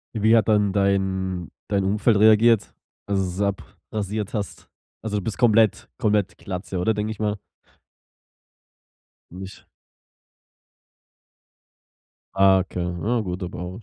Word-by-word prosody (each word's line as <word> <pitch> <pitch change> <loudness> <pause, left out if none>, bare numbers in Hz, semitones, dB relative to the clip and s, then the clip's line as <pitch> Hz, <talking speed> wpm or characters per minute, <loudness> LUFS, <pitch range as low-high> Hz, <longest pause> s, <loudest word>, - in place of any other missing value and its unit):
Wie 110 +2 +4
hat 110 -4 +3
dann 105 -2 +2
dein 95 -3 0 0.2
dein 100 -1 0
Umfeld 105 +3 +2
reagiert? 110 +1 +4 0.3
Als 100 -1 0
du 95 - 0
es 90 +2 -4
abrasiert 100 +1 -4
hast. 105 -3 -5 0.3
Also, 105 -2 -2
du 100 - -3
bist 110 - -4
komplett 110 - +3
komplett 105 -2 0
Glatze, 95 -1 -5
oder, 110 +5 +1
denke 105 +1 -2
ich 110 - -8
mal? 105 -1 -1 1.9
Nicht? 95 +2 -10 2.7
Ah 95 0 +5
okay, 90 -1 -4
ja 90 +7 -1
gut, 90 -2 -5
aber 90 +3 -6
100 Hz, 120 wpm, -23 LUFS, 95-110 Hz, 2.7 s, Ah